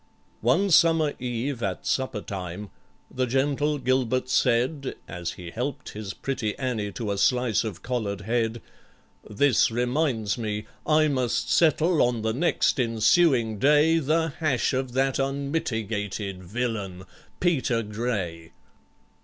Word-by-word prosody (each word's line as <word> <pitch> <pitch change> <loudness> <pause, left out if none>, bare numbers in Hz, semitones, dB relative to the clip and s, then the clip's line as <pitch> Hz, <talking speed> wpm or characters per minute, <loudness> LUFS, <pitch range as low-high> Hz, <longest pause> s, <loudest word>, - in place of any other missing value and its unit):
One 170 - +2
summer 165 -2 +4
eve, 125 +1 -3
at 95 -4 -3
supper 130 -5 -1
time, 95 +2 -6 0.4
the 130 0 -1
gentle 145 +3 +1
GILBERT 130 -1 0
said 130 +3 +1
(As 85 -1 -5
he 85 -2 -9
helped 140 +7 -4
his 105 -2 -7
pretty 130 -6 -3
ANNIE 120 -6 -2
to 110 -4 -3
a 100 - -2
slice 125 +2 +2
of 105 -6 -6
collared 110 -6 -2
head), 115 +1 -1 0.7
"This 120 +4 +3
reminds 120 -2 0
me 105 -1 -3 0.2
I 155 0 +4
must 130 -4 0
settle 165 0 +3
on 120 -2 +1
the 110 0 0
next 150 +1 +1
ensuing 115 - +3
day 150 +5 +4
The 160 +2 +1
hash 150 -5 +1
of 130 -1 -2
that 135 +1 +1
unmitigated 110 - -2
villain 100 -3 -3 0.4
PETER 130 -9 +1
GRAY." 100 -7 -4
125 Hz, 130 wpm, -26 LUFS, 105-140 Hz, 0.7 s, summer